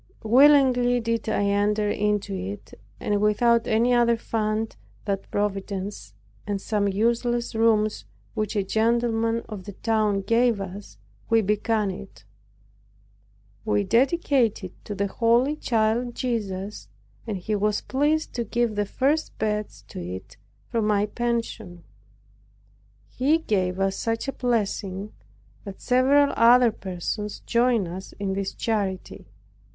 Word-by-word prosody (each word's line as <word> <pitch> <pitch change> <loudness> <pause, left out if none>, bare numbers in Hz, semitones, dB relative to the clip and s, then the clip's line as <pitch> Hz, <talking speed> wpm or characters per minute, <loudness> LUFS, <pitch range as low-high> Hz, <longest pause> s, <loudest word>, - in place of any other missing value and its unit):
Willingly 250 0 +5
did 230 -1 -2
I 205 - +1
enter 205 +1 +1
into 205 -1 0
it; 195 +2 -6 0.3
and 205 -1 0
without 230 +3 +3
any 230 +3 +3
other 235 -1 +3
fund 220 -1 -2 0.3
than 200 -2 0
Providence 195 - -3 0.3
and 205 -1 -1
some 205 0 0
useless 235 +4 0
rooms 215 - +2 0.3
which 215 -1 -2
a 200 - +1
gentleman 230 +2 +1
of 200 -4 -8
the 205 - -7
town 215 -1 0
gave 230 +1 +2
us, 195 - -8 0.3
we 225 0 +4
began 210 0 0
it. 190 - -11 1.4
We 105 -1 +1
dedicated 250 - +1
it - - -28
to 205 - -5
the 200 0 0
holy 235 +7 +2
Child 235 -2 0
Jesus, 205 -5 -3 0.4
and 210 -3 -2
He 215 +4 -4
was 210 0 0
pleased 295 +4 0
to 240 - -2
give 235 +1 0
the 205 -1 -1
first 285 +8 0
beds 210 - -3
to - - -7
it 95 +4 -7 0.3
from 225 -3 -1
my 205 -1 +2
pension. 230 -6 -3 1.2
He 275 - +2
gave 190 - -1
such 225 +5 -2
a 275 - -2
blessing 210 -4 -2 0.5
that 200 -2 -9
several 275 +3 +3
other 240 +1 +6
persons 200 +1 -5
joined 235 -4 +2
us 185 +3 -8
in 195 -1 -3
this 195 0 -3
charity. 190 - -3
215 Hz, 130 wpm, -25 LUFS, 200-235 Hz, 1.4 s, other